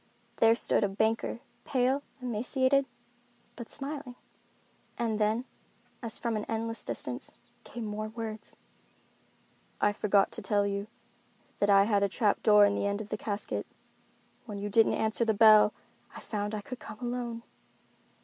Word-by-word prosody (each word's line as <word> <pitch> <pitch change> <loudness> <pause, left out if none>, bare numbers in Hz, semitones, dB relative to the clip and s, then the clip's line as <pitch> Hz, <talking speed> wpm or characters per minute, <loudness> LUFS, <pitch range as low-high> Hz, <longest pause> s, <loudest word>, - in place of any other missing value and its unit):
There 225 0 +5
stood - - +1
the 205 - +3
banker, 220 +3 0 0.2
pale, 260 +1 +1 0.2
emaciated, 260 +4 +1 0.7
but 235 - -8
smiling. 275 -3 -6 0.8
And 225 -2 -1
then, 220 +4 +1 0.6
as 230 -3 -2
from 235 -2 -2
an 210 - -2
endless 225 0 -3
distance, - - -5 0.3
came 235 -2 -7
more 215 +1 -4
words: 220 -1 -7 1.2
"I 205 - +3
forgot 200 -1 +2
to - - -6
tell 205 -1 +1
you 200 0 -2 0.7
that 205 - +2
I 195 0 +7
had 205 -1 +2
a 200 - +2
trap 205 +1 +1
door 210 -1 +7
in 200 - +2
the 200 - -1
end 200 0 -1
of 215 -1 -7
the - - -1
casket. 210 -1 -3 0.8
When 210 -2 -6
you 205 +1 -4
didn't 225 +2 +4
answer 220 +1 +1
the 220 -2 +1
bell, 215 -1 +7 0.4
I - - -7
found 210 0 -3
I 210 - -4
could 255 +4 -8
come - - -9
alone." 240 -1 -4
220 Hz, 155 wpm, -30 LUFS, 205-235 Hz, 1.2 s, I